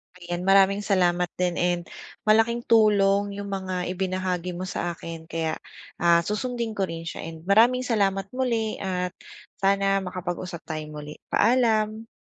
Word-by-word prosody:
Ayan, 175 Hz, -1 st, -5 dB
maraming 195 Hz, +1 st, +5 dB
salamat 180 Hz, -3 st, +2 dB
din 180 Hz, -1 st, 0 dB
and 175 Hz, 0 st, +1 dB, 0.4 s
malaking 225 Hz, +2 st, +3 dB
tulong 205 Hz, -3 st, +4 dB
yung 200 Hz, 0 st, -5 dB
mga 185 Hz, -2 st, -3 dB
ibinahagi 185 Hz, -1 st, -2 dB
mo 180 Hz, -, -4 dB
sa 175 Hz, -2 st, -3 dB
akin 165 Hz, -1 st, -8 dB
kaya, 160 Hz, -1 st, -2 dB, 0.4 s
ah, 170 Hz, 0 st, +5 dB
susundin 230 Hz, +2 st, -2 dB
ko 195 Hz, -2 st, -1 dB
rin 165 Hz, 0 st, -6 dB
siya -, -, -5 dB
and 160 Hz, -1 st, -9 dB
maraming 235 Hz, +6 st, +4 dB
salamat 195 Hz, -4 st, +1 dB
muli 230 Hz, -4 st, -1 dB
at 180 Hz, -2 st, -2 dB, 0.5 s
sana 195 Hz, 0 st, +2 dB
makapag-usap 180 Hz, -1 st, -5 dB
tayong 155 Hz, -1 st, -5 dB
muli. 150 Hz, 0 st, -8 dB
Paalam. 220 Hz, -2 st, +2 dB
190 Hz, 145 wpm, -25 LUFS, 175-215 Hz, 0.5 s, maraming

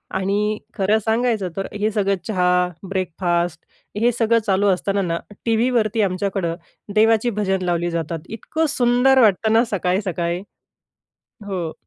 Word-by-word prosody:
आणि 205 Hz, +3 st, 0 dB, 0.2 s
खरं 210 Hz, +1 st, +2 dB
सांगायचं 220 Hz, -4 st, +1 dB
तर, 195 Hz, -, -2 dB
हे 210 Hz, +1 st, -1 dB
सगळं 200 Hz, -1 st, +1 dB
चहा 180 Hz, -4 st, +1 dB, 0.4 s
ब्रेकफास्ट 175 Hz, -2 st, -1 dB, 0.4 s
हे 240 Hz, +1 st, +4 dB
सगळं 230 Hz, 0 st, +2 dB
चालू 200 Hz, +1 st, +2 dB
असताना 195 Hz, +2 st, 0 dB
ना, 170 Hz, -2 st, -1 dB, 0.3 s
टीव्हीवरती 225 Hz, -1 st, +1 dB
आमच्याकडं 185 Hz, -3 st, -1 dB, 0.4 s
देवाची 225 Hz, +2 st, +4 dB
भजन 195 Hz, -3 st, -1 dB
लावली 175 Hz, 0 st, 0 dB
जातात, 165 Hz, -1 st, -3 dB
इतकं 315 Hz, +8 st, -2 dB
सुंदर 250 Hz, +2 st, +4 dB
वाटतं 220 Hz, +1 st, +3 dB
ना, 230 Hz, +2 st, +5 dB
सकाळी-सकाळी 180 Hz, -2 st, -1 dB, 1.1 s
हो. 175 Hz, -5 st, -3 dB
200 Hz, 125 wpm, -21 LUFS, 180-225 Hz, 1.1 s, ना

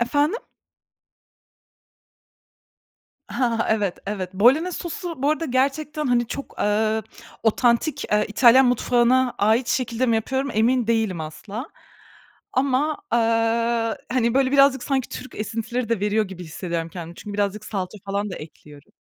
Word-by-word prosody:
Efendim? 290 Hz, -, +1 dB, 2.9 s
Hah, 235 Hz, -4 st, 0 dB
evet, 205 Hz, -4 st, 0 dB
evet. 195 Hz, -3 st, -4 dB
Bolonez 285 Hz, -, +3 dB
sosu 335 Hz, -3 st, -6 dB
bu 285 Hz, -, +3 dB
arada 310 Hz, +2 st, -1 dB
gerçekten, 290 Hz, +3 st, 0 dB
hani, 240 Hz, -1 st, +2 dB
çok, 275 Hz, +4 st, -7 dB
eee, 215 Hz, +1 st, +1 dB, 0.4 s
otantik, 235 Hz, +6 st, +2 dB
eee, 210 Hz, 0 st, +3 dB
İtalyan 250 Hz, +4 st, +6 dB
mutfağına 245 Hz, +1 st, +2 dB
ait 220 Hz, +4 st, +2 dB
şekilde 250 Hz, 0 st, 0 dB
mi 230 Hz, -1 st, +3 dB
yapıyorum 265 Hz, +5 st, -1 dB
emin 235 Hz, +2 st, +2 dB
değilim 220 Hz, -7 st, 0 dB
asla. 200 Hz, -, -7 dB, 0.9 s
Ama, 275 Hz, +3 st, +1 dB
eee, -, -, +4 dB, 0.9 s
hani, 235 Hz, -2 st, +1 dB
böyle, 265 Hz, -1 st, +3 dB
birazcık 275 Hz, -2 st, +5 dB
sanki 265 Hz, -3 st, -1 dB
Türk 255 Hz, -, -8 dB
esintileri 225 Hz, +3 st, -3 dB
de 230 Hz, -4 st, 0 dB
veriyor 210 Hz, +1 st, +1 dB
gibi 180 Hz, -2 st, -8 dB
hissediyorum 165 Hz, 0 st, -4 dB
kendimi. 170 Hz, -1 st, -8 dB
Çünkü 205 Hz, -1 st, -8 dB
birazcık 205 Hz, +1 st, -1 dB
salça 195 Hz, -1 st, -4 dB
falan 200 Hz, +1 st, -2 dB
da -, -, -6 dB
ekliyorum. 150 Hz, -2 st, -13 dB
235 Hz, 130 wpm, -23 LUFS, 210-265 Hz, 2.9 s, İtalyan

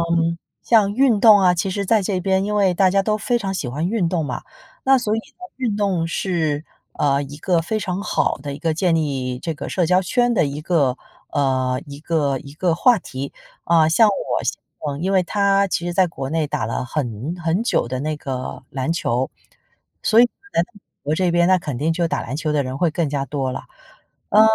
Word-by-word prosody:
嗯， 165 Hz, 0 st, 0 dB, 0.2 s
像 210 Hz, -4 st, +4 dB
运 245 Hz, -2 st, +3 dB
动 215 Hz, -1 st, +8 dB
啊， 180 Hz, -2 st, +4 dB
其 180 Hz, +3 st, -1 dB
实 200 Hz, +1 st, -2 dB
在 220 Hz, +1 st, +3 dB
这 190 Hz, -1 st, -1 dB
边 190 Hz, +1 st, +1 dB
因 210 Hz, +1 st, -2 dB
为 195 Hz, -3 st, +3 dB
大 190 Hz, +1 st, +4 dB
家 195 Hz, +1 st, +2 dB
都 215 Hz, 0 st, +1 dB
非 240 Hz, +3 st, 0 dB
常 195 Hz, -4 st, -3 dB
喜 145 Hz, -9 st, -3 dB
欢 150 Hz, +8 st, -2 dB
运 195 Hz, -5 st, 0 dB
动 165 Hz, -3 st, -1 dB
嘛。 -, -, -4 dB, 0.4 s
那 270 Hz, 0 st, +6 dB
所 220 Hz, -3 st, 0 dB
以 -, -, 0 dB
呢 -, -, -16 dB, 0.2 s
运 240 Hz, -6 st, -1 dB
动 190 Hz, -5 st, 0 dB
是， 160 Hz, -4 st, -1 dB, 0.3 s
呃， 140 Hz, -1 st, +1 dB
一 145 Hz, +1 st, -8 dB
个 170 Hz, 0 st, +1 dB
非 215 Hz, +6 st, -2 dB
常 185 Hz, -1 st, -3 dB
好 -, -, 0 dB
的 140 Hz, +1 st, -5 dB
一 -, -, -8 dB
个 165 Hz, -1 st, -1 dB
建 170 Hz, +1 st, +1 dB
立 135 Hz, -5 st, -1 dB
这 165 Hz, +4 st, -4 dB
个 145 Hz, -, -7 dB
社 180 Hz, -3 st, +1 dB
交 185 Hz, +2 st, +3 dB
圈 240 Hz, +5 st, +1 dB
的 195 Hz, -, +3 dB
一 145 Hz, +2 st, -5 dB
个 145 Hz, -7 st, +1 dB, 0.3 s
呃， 130 Hz, -2 st, +1 dB
一 140 Hz, 0 st, -9 dB
个 150 Hz, -4 st, 0 dB
一 140 Hz, -1 st, -12 dB
个 170 Hz, +1 st, +1 dB
话 240 Hz, +7 st, +4 dB
题。 135 Hz, +1 st, -6 dB, 0.3 s
啊， 165 Hz, -2 st, +4 dB
像 220 Hz, +7 st, +5 dB
我 200 Hz, -, -1 dB
先 -, -, 0 dB, 0.3 s
生， 145 Hz, 0 st, -3 dB
因 190 Hz, +3 st, 0 dB
为 190 Hz, -, +4 dB
他 200 Hz, +1 st, +2 dB
其 175 Hz, -, -2 dB
实 175 Hz, -, -2 dB
在 185 Hz, 0 st, +3 dB
国 135 Hz, -5 st, -6 dB
内 160 Hz, -1 st, 0 dB
打 110 Hz, -, -2 dB
了 115 Hz, +3 st, -3 dB
很 130 Hz, +2 st, -3 dB
很 165 Hz, +6 st, +1 dB
久 235 Hz, -, +1 dB
的 130 Hz, +1 st, -3 dB
那 155 Hz, +2 st, -2 dB
个 130 Hz, -4 st, -5 dB
篮 135 Hz, +4 st, -2 dB
球， 130 Hz, -6 st, -1 dB, 0.7 s
所 220 Hz, +2 st, +5 dB
以 -, -, +8 dB, 0.3 s
来 -, -, +3 dB
美 205 Hz, -, -16 dB, 0.2 s
国 145 Hz, -, -1 dB
这 180 Hz, +1 st, +1 dB
边 175 Hz, 0 st, +3 dB
那 185 Hz, -, +5 dB
肯 150 Hz, -7 st, -4 dB
定 155 Hz, +5 st, +1 dB
就 170 Hz, 0 st, 0 dB
打 -, -, -2 dB
篮 130 Hz, +5 st, -5 dB
球 155 Hz, -1 st, -1 dB
的 145 Hz, -, +2 dB
人 130 Hz, +1 st, -5 dB
会 170 Hz, +3 st, +2 dB
更 160 Hz, -1 st, -1 dB
加 140 Hz, -1 st, -2 dB
多 135 Hz, -1 st, -2 dB
了。 -, -, -5 dB, 0.7 s
呃， 215 Hz, -, +6 dB
170 Hz, 245 characters per minute, -21 LUFS, 145-195 Hz, 0.7 s, 动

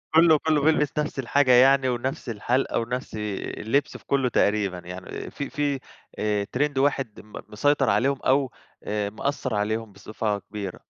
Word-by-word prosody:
كُلُّه، 160 Hz, -1 st, +7 dB
كُلُّه 155 Hz, -2 st, +3 dB
بيلبس 150 Hz, -1 st, +2 dB
نفس 150 Hz, -2 st, -2 dB
الحاجة 135 Hz, +1 st, +3 dB
يعني، 130 Hz, +1 st, +6 dB
ونفس 125 Hz, +1 st, -3 dB
الحَالِقة، 120 Hz, +5 st, 0 dB
ونفس 125 Hz, +2 st, -4 dB
اللِّبس 105 Hz, +5 st, -2 dB
في -, -, -22 dB
كُلُذه 135 Hz, -2 st, +1 dB
تقريبًا، 100 Hz, -5 st, +1 dB
يعني 90 Hz, +1 st, -8 dB
في 140 Hz, -, -5 dB
في 145 Hz, -4 st, -1 dB, 0.4 s
آآ 105 Hz, -1 st, 0 dB
ترند 145 Hz, +1 st, 0 dB
واحد 135 Hz, -5 st, 0 dB
م 105 Hz, -, -16 dB, 0.2 s
مسيطر 135 Hz, +5 st, +2 dB
عليهم 135 Hz, +1 st, +2 dB
أو 135 Hz, 0 st, +2 dB, 0.3 s
آآ 105 Hz, -1 st, -2 dB
مأثِّر 130 Hz, +1 st, -2 dB
عليهم 110 Hz, +1 st, -1 dB
بصفة 105 Hz, +1 st, -3 dB
كبيرة. 100 Hz, -3 st, -7 dB
125 Hz, 155 wpm, -25 LUFS, 105-140 Hz, 0.4 s, كُلُّه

